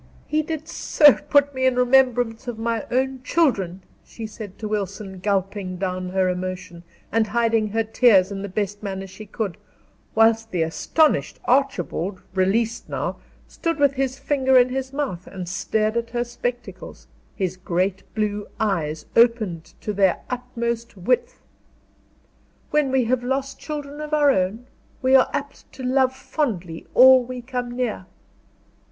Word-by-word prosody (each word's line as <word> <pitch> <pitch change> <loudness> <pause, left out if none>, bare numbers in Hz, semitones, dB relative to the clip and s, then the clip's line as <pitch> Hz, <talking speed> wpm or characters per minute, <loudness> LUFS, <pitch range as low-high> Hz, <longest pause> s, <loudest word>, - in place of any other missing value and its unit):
"He 305 0 +1
did 315 0 -5
so 295 -4 +5
put 285 -1 +2
me 260 0 +1
in 255 - +2
remembrance 250 -1 +3
of 240 -2 -4
my 230 -1 -2
own 260 +1 0
children," 200 - 0 0.2
she 225 - -8
said 215 -2 -9
to 215 - -5
Wilson, 200 -2 -4
gulping 195 -1 -2
down 185 -1 -3
her 190 0 +1
emotion, 180 -1 -4 0.3
and 225 -1 +2
hiding 225 0 +1
her 225 +2 0
tears 215 -4 +4
in 195 -1 -4
the 200 - -5
best 205 +1 -3
manner 195 -2 -4
she 195 +3 -11
could; 205 -3 -4 0.6
whilst 225 0 +4
the 175 -5 0
astonished 300 - +1
Archibald, 205 - 0
released 215 +5 0
now, - - -3 0.3
stood 330 -1 -2
with 285 -2 +3
his 270 -1 -1
finger 265 -3 +2
in 250 0 +5
his 265 0 -3
mouth 275 -12 -3
and 185 -2 -7
stared 215 +4 -1
at 235 0 -1
her 240 0 -1
spectacles, 245 0 -6 0.3
his 185 -3 -2
great 185 +1 -1
blue 210 -1 -1
eyes 165 -8 -1
opened 225 -8 +3 0.2
to 210 - -3
their 195 -3 +2
utmost 235 -2 -3
width. 240 +8 -1 1.3
"When 295 -3 +2
we 265 -1 +3
have 245 +1 0
lost 270 +2 -2
children 295 -1 -6
of 305 0 -1
our 290 -2 +5
own, 205 +2 -1 0.4
we 260 +1 +3
are 265 -1 +6
apt 285 0 -6
to 260 - -9
love 260 0 +2
fondly 195 - -3
all 260 0 +8
we 250 0 -7
come 250 -1 -4
near." 235 -7 -2
230 Hz, 155 wpm, -23 LUFS, 195-260 Hz, 1.3 s, all